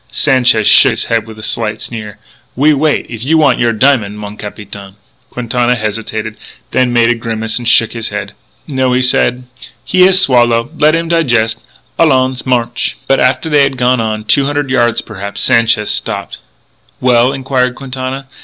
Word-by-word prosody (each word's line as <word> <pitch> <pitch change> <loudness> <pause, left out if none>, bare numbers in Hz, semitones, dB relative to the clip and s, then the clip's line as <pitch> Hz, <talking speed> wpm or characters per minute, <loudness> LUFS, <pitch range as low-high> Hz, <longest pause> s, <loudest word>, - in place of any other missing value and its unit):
Sanchez 125 -6 +2
shook - - +6
his - - -2
head 115 -1 -1
with 110 -1 -11
a 110 - -10
slight 110 -1 -2
sneer: 105 -3 -8 0.4
"We 150 +4 +3
wait 150 +1 0
if 115 -1 -8
you 160 +5 +2
want 145 -5 +3
your 120 -1 +2
diamond, 115 -4 +1
mon 105 0 -8
capitaine." 100 -2 -10 0.3
Quintana 125 0 -1
hesitated, 110 0 -4 0.3
then 125 -1 +1
made 120 0 +3
a - - +3
grimace 110 -1 -3
and 120 - -6
shook 115 -1 +3
his 115 -2 -4
head. 105 0 -6 0.3
"No," 130 -3 0
he 130 +1 +1
said, 125 0 +1 0.4
"he 185 - +1
has 190 0 +4
swallow. 120 -5 +2
Let 155 +1 +3
him 165 0 -2
digest. 120 -9 0 0.4
Allons! 130 -5 +1
March!" 120 -2 -1
But 135 - +2
after 130 +5 +1
they 150 -2 +3
had 135 -1 +1
gone 125 0 +1
on 110 -1 -3
two 135 +6 +2
hundred 145 -2 -2
yards, 120 -3 +1
perhaps 100 -2 -7
Sanchez 115 -2 +2
stopped. - - -4 0.6
"Well?" 125 0 +3
inquired 130 -2 -1
Quintana. 130 +1 -6
120 Hz, 170 wpm, -13 LUFS, 110-135 Hz, 0.6 s, shook